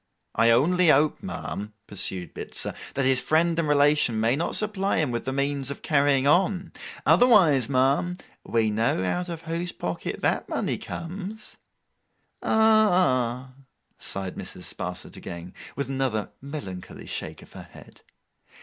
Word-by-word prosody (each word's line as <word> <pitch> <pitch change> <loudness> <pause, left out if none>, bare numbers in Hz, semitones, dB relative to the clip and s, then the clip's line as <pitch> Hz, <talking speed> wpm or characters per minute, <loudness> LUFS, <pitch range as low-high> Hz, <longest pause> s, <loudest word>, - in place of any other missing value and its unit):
'I 115 +1 +4
only 170 +10 +4
hope, 150 +2 +3
ma'am,' 105 - -6
pursued 95 -3 -1
Bitzer, - - -3 0.2
'that 135 - +1
his 130 -1 +4
friend 165 +1 +2
and 165 - 0
relation 145 -5 +3
may 115 +3 +2
not 165 +4 -1
supply 205 -2 +1
him 155 -6 +1
with 120 - -3
the 130 - -1
means 140 0 -1
of 140 - -7
carrying 140 -3 +3
on. 180 +3 +2 0.3
Otherwise, 165 - +5
ma'am, 140 +7 +2 0.3
we 110 -2 +1
know 110 -3 +1
out 175 - -1
of 165 -1 -6
whose 170 +2 -2
pocket 90 -1 -5
that - - 0
money - - -1
comes.' 195 +5 -7 0.8
'Ah—h!' 180 - +3 0.5
sighed 95 -2 -5
Mrs. - - -7
Sparsit - - -6
again, 85 +1 -8 0.2
with 140 - -2
another 130 -6 -2
melancholy 135 -11 -8
shake - - -5
of - - -18
her - - -10
head. - - -15
140 Hz, 140 wpm, -25 LUFS, 120-175 Hz, 0.8 s, Otherwise